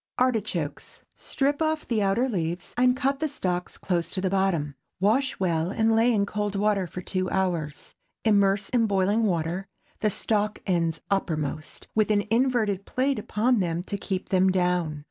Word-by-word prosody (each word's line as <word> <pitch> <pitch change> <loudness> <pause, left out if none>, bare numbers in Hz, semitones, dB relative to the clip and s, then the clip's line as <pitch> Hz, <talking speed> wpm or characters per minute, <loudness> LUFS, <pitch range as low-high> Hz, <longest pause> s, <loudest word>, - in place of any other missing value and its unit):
ARTICHOKES. 215 - -1
Strip 285 +2 -1
off 315 -1 0
the 225 -3 0
outer 200 +6 +2
leaves, 175 -6 -3
and 250 +1 +3
cut 275 0 0
the 315 - 0
stalks 180 -10 -3
close 175 -3 -1
to - - -3
the 185 0 -1
bottom. 185 -7 +1 0.3
Wash 235 +8 +1
well 170 -3 0
and 220 +2 +2
lay 230 +2 +4
in 205 -3 +2
cold 205 0 -2
water 200 -2 +1
two 185 +2 -3
hours. 170 -6 -2 0.3
Immerse 200 -2 +3
in 235 -3 +2
boiling 200 +2 +2
water, 175 +2 -1 0.3
the 215 - +2
stalk 210 +1 0
ends 165 -3 0
uppermost, 155 -5 -2
with 215 -1 +2
an 205 -1 +3
inverted 225 -5 +2
plate 260 +3 0
upon 225 +3 +1
them 170 -2 -1
to 200 - -4
keep 190 -1 -4
them 190 0 +4
down. 180 -4 0
195 Hz, 165 wpm, -26 LUFS, 180-225 Hz, 0.3 s, lay